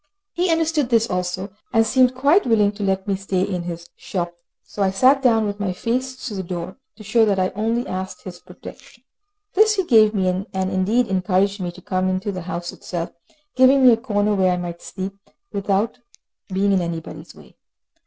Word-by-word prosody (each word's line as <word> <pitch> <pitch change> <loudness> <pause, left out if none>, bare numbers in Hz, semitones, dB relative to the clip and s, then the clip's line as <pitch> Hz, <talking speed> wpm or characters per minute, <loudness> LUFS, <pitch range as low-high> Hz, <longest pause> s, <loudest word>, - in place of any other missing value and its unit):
He 355 +1 0
understood 325 -5 +1
this 230 -2 +3
also, 180 +2 -3 0.2
and 225 0 +3
seemed 255 +2 +3
quite 285 +9 +3
willing 210 -3 +3
to 210 0 -10
let 195 0 -1
me 200 - +1
stay 190 -1 -1
in 185 -3 -2
his 170 -1 -6
shop, 175 -2 -4 0.3
so 205 - -7
I 195 - +3
sat 260 +8 +4
down, 225 -4 +3
with 205 0 -4
my 195 -3 -1
face 255 +6 -2
to 220 - -5
the 195 - -3
door, 175 0 -6 0.2
to 215 - -12
show 225 +2 +3
that 205 -3 +2
I 185 0 +1
only 225 +4 -1
asked 185 0 -5
his 180 -2 -9
protection. 215 +6 -13 0.5
This 430 +2 +4
he 385 - +1
gave 220 -6 +5
me, 190 -2 +1
and 190 0 -2
indeed 205 +6 +2
encouraged 190 +1 0
me 175 -1 -3
to 180 - -15
come 185 0 0
into 185 +2 -2
the 185 -2 -5
house 175 +1 -4
itself, 170 -1 -5 0.4
giving 260 +1 +5
me 250 - +9
a - - +2
corner 210 -3 0
where 190 -2 +2
I 180 - 0
might 175 -1 -6
sleep, 190 +1 -6 0.4
without 200 +4 -1 0.5
being 195 +2 +1
in 190 -2 +3
anybody's 165 -2 -6
way. - - -17
200 Hz, 200 wpm, -21 LUFS, 185-230 Hz, 0.5 s, me